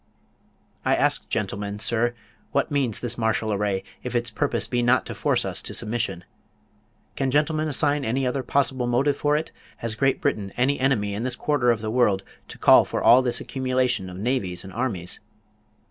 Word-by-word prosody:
I - - +3
ask - - +1
gentlemen, 100 0 -3
sir, 120 +2 0 0.4
what - - +1
means 135 -7 0
this 120 0 -2
martial 110 -1 0
array, 100 -1 -1 0.2
if 125 0 -5
its 120 0 0
purpose 145 +6 -1
be 120 -1 -1
not 120 +2 +3
to - - -6
force - - +1
us - - -1
to - - -3
submission? 115 -6 -2 0.9
Can 135 -1 0
gentlemen 155 +3 +1
assign 145 0 +1
any 130 +3 0
other 125 +2 -1
possible 130 -1 0
motive 135 +4 +2
for 145 +1 +1
it? 160 +2 -2 0.3
Has 115 -1 -3
Great 135 +4 +1
Britain 100 -2 -1
any 135 +3 +2
enemy 120 -7 +1
in 105 - -3
this 125 0 -1
quarter 145 -4 +1
of 115 -2 +2
the 110 0 -3
world, 105 -6 +2 0.2
to - - -10
call - - +7
for - - -3
all 125 +2 +7
this 125 -2 0
accumulation 130 -6 -1
of 90 - -9
navies 100 -5 -2
and 95 -1 -10
armies? 105 -8 -3
120 Hz, 185 wpm, -24 LUFS, 110-135 Hz, 0.9 s, call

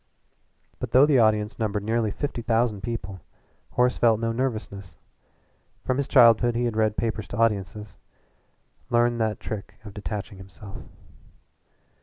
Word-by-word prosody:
But - - -6
though 130 +3 +7
the 145 -4 +3
audience 105 -1 +2
numbered 105 -2 -1
nearly 110 0 0
five 145 +7 -3
thousand 115 -3 0
people, 100 -4 -5 0.5
Horace 125 0 +2
felt 115 -2 +4
no 115 0 -1
nervousness. 110 - -4 0.9
From 130 - 0
his 140 - -1
childhood 115 0 +5
he 120 +1 0
had 115 -2 -2
read 110 -1 +1
papers 110 -2 -2
to 100 - -7
audiences 105 -2 -1 0.9
learned 120 0 +2
that 110 -1 -1
trick 105 -3 -7
of 105 - -9
detaching 105 0 -6
himself. 95 +1 -11
110 Hz, 140 wpm, -25 LUFS, 105-120 Hz, 0.9 s, though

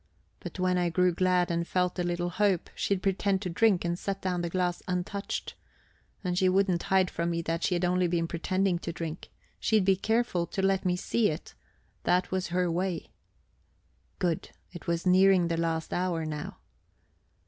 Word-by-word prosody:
But - - -8
when 185 0 +1
I 175 -1 +1
grew 180 +1 +2
glad 180 0 +2
and 170 0 -1
felt 180 0 0
a - - +1
little 175 0 -1
hope, 195 -1 +1
she'd 195 -2 -1
pretend 195 0 +1
to 180 - -3
drink, 190 -1 +3
and 170 +1 -1
set 195 -1 -3
down 180 -2 -1
the 170 - -2
glass 180 0 -1
untouched. 180 +2 -3 0.7
And 180 -2 -1
she 185 +1 +3
wouldn't 185 -2 +2
hide 190 -2 +2
from 170 +1 -1
me 170 0 -1
that 165 +1 -2
she'd 180 -1 +1
only 180 0 +2
been 170 -1 0
pretending 185 +2 0
to 170 - -4
drink; 165 0 -6 0.3
she'd 215 -4 +2
be 195 0 +5
careful 220 -4 0
to 195 - -3
let 195 -1 +2
me 180 -1 +2
see 215 +4 +1
it. 155 - -6 0.5
That 180 0 +1
was 185 0 -1
her 180 0 0
way. 180 0 -2 1.1
Good 175 -4 -1 0.2
it 175 - -10
was 170 +1 -1
nearing 185 -1 +5
the 165 - 0
last 165 -1 -1
hour 175 -3 -1
now. 150 -1 -5
180 Hz, 180 wpm, -29 LUFS, 170-190 Hz, 1.1 s, be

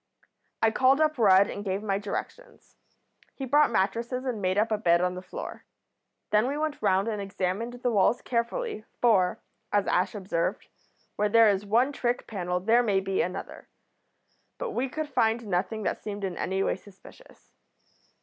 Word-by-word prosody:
"I 225 - +5
called 260 +4 +4
up 310 -3 +1
Rudd 200 -2 +6
and 205 - -6
gave 195 +1 -2
my 195 -2 0
directions. 480 - -7 0.6
He 270 - -5
brought 290 +3 +4
mattresses 235 +5 -1
and 240 -5 -3
made 185 0 0
up 220 +2 +2
a 215 - +2
bed 170 -4 +4
on 180 0 0
the 180 - -6
floor. - - -8 0.7
Then 215 +3 +3
we 280 +2 -2
went 305 -1 -2
round 195 0 +2
and 210 -2 -2
examined 200 +4 -3
the 245 0 -2
walls 215 +3 +2
carefully, 235 - -2 0.2
for, 195 -7 +3 0.3
as 205 -1 +2
Ash 185 +4 +1
observed, 185 -4 -2 0.5
where 210 0 +1
there 225 0 +6
is 200 0 -1
one 240 +7 +3
trick 245 -3 -1
panel 180 -4 -2
there 225 +6 +4
may 205 -5 +2
be 195 0 -1
another. 180 - -5 0.9
But - - -4
we 265 -7 -1
could 310 +3 -4
find 230 -3 +1
nothing 200 +3 -2
that - - -2
seemed 205 -1 -6
in 185 -2 -2
any 190 +2 -1
way - - 0
suspicious. 205 - -18
215 Hz, 175 wpm, -27 LUFS, 195-245 Hz, 0.9 s, Rudd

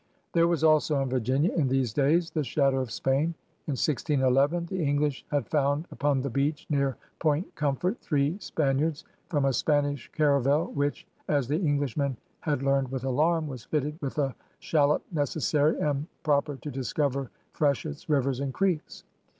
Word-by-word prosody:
' - - -44
There 170 0 +4
was 170 -2 0
also 155 -1 +4
on 135 -2 0
Virginia 130 - +1
in 150 -6 +1
these 130 -4 0
days 160 +6 +2
the 155 - -1
shadow 135 +1 +1
of 130 -2 -2
Spain. 135 +8 0 0.3
In 150 - 0
1611 145 +3 +2
the 180 0 -3
English 145 -1 0
had 145 -1 0
found 145 +1 +1
upon 140 -2 0
the 140 - -2
beach 145 +4 -1
near 140 -3 +1 0.2
Point 155 +2 0
Comfort 150 - -1
three 145 +1 +1
Span 140 -7 0
iards 155 0 -1 0.3
from 145 -4 +1
a 135 - +2
Spanish 145 0 0
caravel 145 +1 +2
which, 145 0 -1 0.2
as 145 -5 +1
the 150 +4 0
English 145 - 0
men 140 -4 0 0.2
had 145 -4 -1
learned 135 -1 +2
with 130 -2 -3
alarm, 155 +5 +1
was 130 -6 -7
fitted 150 +1 -2
with 140 0 -4
a 135 -3 +1 0.2
shallop 150 -2 +2
necessarie 150 0 +1
and 145 0 -1 0.2
propper 145 -1 +1
to 150 - -5
discover 135 0 -1 0.2
fresh 145 -2 +1
etts, 155 +1 -7
rivers, 135 -3 +1
and 140 -1 -3
creekes.' 185 -5 -1
145 Hz, 175 wpm, -28 LUFS, 135-155 Hz, 0.3 s, There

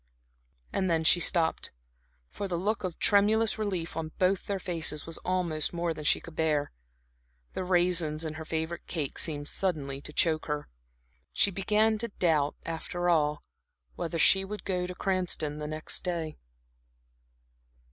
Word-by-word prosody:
And 190 -1 +1
then 165 -1 +2
she 170 +2 +6
stopped, 165 -2 +2 0.6
for 200 - -4
the 175 -2 -2
look 205 +4 -1
of 180 -3 -3
tremulous 215 +2 +4
relief 185 -6 -2
on 160 -1 -4
both 185 0 +1
their 200 - 0
faces 165 -5 -1
was 165 - -5
almost 175 -5 0
more 170 -1 -1
than 150 -1 -8
she - - +4
could 165 - -12
bear. 150 -3 +1 0.8
The - - -2
raisins 175 -3 +2
in 155 - -3
her 160 0 -6
favorite 160 +1 -3
cake 150 -6 -3
seemed 145 -3 -1
suddenly 145 -8 -2
to 150 - -7
choke 155 0 +2
her. 150 -1 -2 0.7
She 200 - +3
began 215 +3 +2
to 235 - 0
doubt, 160 -8 +1
after 175 +2 -2
all, 150 -3 +2 0.5
whether 165 0 -3
she 190 +3 +5
would 205 +2 -6
go 180 -2 -1
to 180 - -6
Cranston 180 -6 -1
the 150 - -4
next 155 +1 -4
day. 165 -4 -2
170 Hz, 155 wpm, -29 LUFS, 155-185 Hz, 0.8 s, she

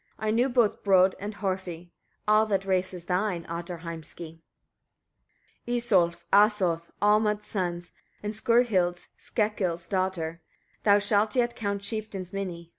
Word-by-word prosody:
I 215 0 -1
knew 240 +4 +2
both 240 -4 +2
Brodd 190 -1 +5
and 205 +1 -5
Horfi. 185 -4 -4 0.4
All 215 +1 +4
that 195 -2 0
race 185 -1 +1
is 180 -2 -8
thine, 180 -1 -1
Ottar 170 0 -5
Heimski! 165 0 -8 1.3
22. 240 - -1
Isolf, 175 -8 +1
Asolf, 195 -5 +3
Olmod's 210 0 +3
sons 175 -3 -3 0.3
and 210 +1 -3
Skurhild's 215 -6 +2
Skekkil's 190 -6 -1
daughter; 175 -3 -2 0.4
thou 205 -1 +5
shalt 205 +2 +2
yet 240 -1 +1
count 200 -2 -3
chieftains 200 -4 -5
many. 175 -4 -5
195 Hz, 130 wpm, -27 LUFS, 175-215 Hz, 1.3 s, Brodd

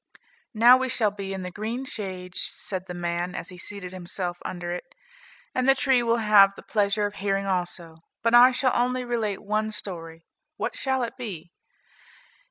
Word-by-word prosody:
"Now 240 +3 +8
we 260 0 -1
shall 225 -4 +1
be 195 -1 -6
in 190 -1 -4
the 180 - -5
green 225 +7 -4
shade," 185 -6 -6
said 190 0 -1
the 180 - -6
man, 175 +1 -2
as - - -5
he 180 - -10
seated 195 -1 -6
himself 175 -1 -4
under 175 -1 -5
it, 175 - -7 0.6
"and 255 +1 +1
the 270 - +7
tree 260 -1 +3
will 230 0 +2
have 205 -3 +6
the - - -12
pleasure 205 -1 +1
of 205 - -3
hearing 195 0 -1
also, 175 -3 -3 0.3
but 230 0 +2
I 245 +2 +9
shall 255 0 +1
only 250 +1 +1
relate 225 -5 -2
one 215 +1 0
story; 165 -6 -7 0.3
what - - -2
shall 265 -2 0
it 240 +2 -5
be? 190 -9 -7
205 Hz, 180 wpm, -26 LUFS, 180-240 Hz, 0.6 s, I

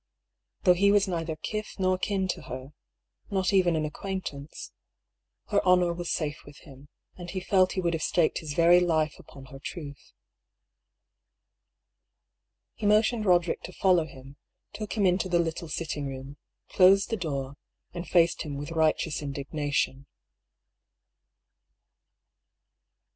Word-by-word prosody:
Though 180 - +6
he 200 +3 +3
was 205 -1 +3
neither 165 -3 -2
kith 215 +7 -5
nor 185 -1 +1
kin 190 -1 -1
to - - -2
her 130 +3 -8 0.3
— - - -34
^not 190 0 +1
even 180 -3 +4
an 155 -1 0
acquaintance 155 -3 -6 0.4
— - - -44
^her 200 - +3
honour 180 -1 +4
was 175 0 -5
safe 150 -2 -2
with 145 0 -14
him> 140 -1 -15 0.3
and 175 -1 -8
he 190 - -3
felt 185 0 +2
he 185 - -1
would 170 -1 0
have 165 - -2
staked 165 -1 +1
his 150 -3 -6
very 170 +1 +6
life 160 -3 0
upon 135 -1 -13
her 135 - -9
truth. 145 -2 -8 2.6
He 210 - -3
motioned 215 +1 +3
Roderick 175 -2 +3
to 185 - -9
follow 180 -5 +3
him, 135 0 -13 0.4
took 215 -1 -5
him 205 -3 +1
into 185 +1 +2
the 175 - +3
little 165 -1 -2
sitting 150 -3 -3
room, 135 +1 -8 0.3
closed 195 +3 +5
the - - +2
door, 140 -8 -4 0.4
and 175 0 -6
faced 170 -1 +3
him 145 -3 -5
with 145 +3 -6
righteous 160 -1 +1
indignation. 140 -1 -2
170 Hz, 145 wpm, -27 LUFS, 145-185 Hz, 2.6 s, Though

